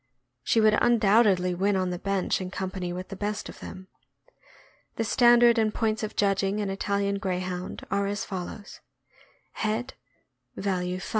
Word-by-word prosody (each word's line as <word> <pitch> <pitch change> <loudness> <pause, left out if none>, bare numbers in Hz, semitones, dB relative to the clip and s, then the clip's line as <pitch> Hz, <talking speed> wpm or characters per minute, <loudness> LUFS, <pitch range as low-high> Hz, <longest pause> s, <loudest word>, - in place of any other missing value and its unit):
She 225 - +2
would 215 -1 +5
undoubtedly 205 -5 +4
win 195 +3 +1
on 185 -1 0
the 180 - -4
bench 195 -1 -1
in 185 - -4
com 190 0 -4
pany 180 -2 -4
with 185 +1 -6
the 195 - -6
best 205 +2 -3
of - - -11
them. 185 0 -9 1.1
The 225 - -1
standard 240 +1 +5
and 220 -1 +2
points 220 -1 -1
of 215 -1 -4
judging 195 0 +1
an 200 -2 -2
Italian 200 0 -1
Grey 185 -2 -1
hound 180 0 -5
are 200 0 +1
as 205 0 -3
follows: 190 +2 -7 0.8
Value. 220 +4 -1 0.7
Value. 185 -2 -2
200 Hz, 160 wpm, -27 LUFS, 185-215 Hz, 1.1 s, would